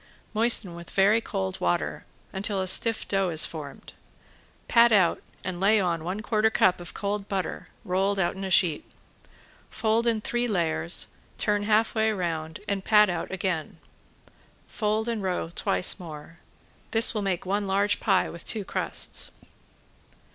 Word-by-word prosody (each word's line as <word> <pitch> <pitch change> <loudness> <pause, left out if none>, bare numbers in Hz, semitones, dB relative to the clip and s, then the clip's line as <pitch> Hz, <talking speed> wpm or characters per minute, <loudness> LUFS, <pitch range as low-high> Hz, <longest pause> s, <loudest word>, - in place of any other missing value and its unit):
Moisten 220 -4 +4
with 170 0 -10
very 205 +4 +3
cold 95 - -4
water 85 0 -1 0.3
until 195 +1 0
a 190 - -1
stiff 225 +4 +3
dough 195 -2 +1
is 160 -2 +3
formed. 150 -4 -9 0.7
Pat 235 0 +5
out 190 -6 +3 0.2
and 180 -2 -4
lay 210 +3 +4
on 170 -4 -1
one 185 +5 -4
quarter 215 0 +2
cup 185 -4 +2
of 175 - -8
cold 200 0 -3
butter 190 -2 -4 0.2
rolled 195 +1 0
out 185 -1 0
in 195 - -7
a 190 - -3
sheet. 175 -4 +2 0.9
Fold 225 +1 0
in 230 -2 +2
three 240 +3 -1
layers, 160 - 0 0.3
turn 205 0 0
half 220 +1 +2
way 220 -1 +2
round, 165 -4 -4
and 200 -1 -2
pat 210 -2 +5
out 175 - -4
again. 185 -4 -3 0.9
Fold 215 +1 -1
and 230 -3 -2
roll 185 -3 -2
twice 180 +3 +1
more. 165 -1 -10 0.5
This 225 +2 +4
will 215 - -2
make 195 -3 -2
one 200 +2 -1
large 200 +2 +1
pie 195 -3 +2
with 170 - -9
two 215 -3 -3
crusts. - - -3
195 Hz, 155 wpm, -26 LUFS, 175-215 Hz, 0.9 s, Pat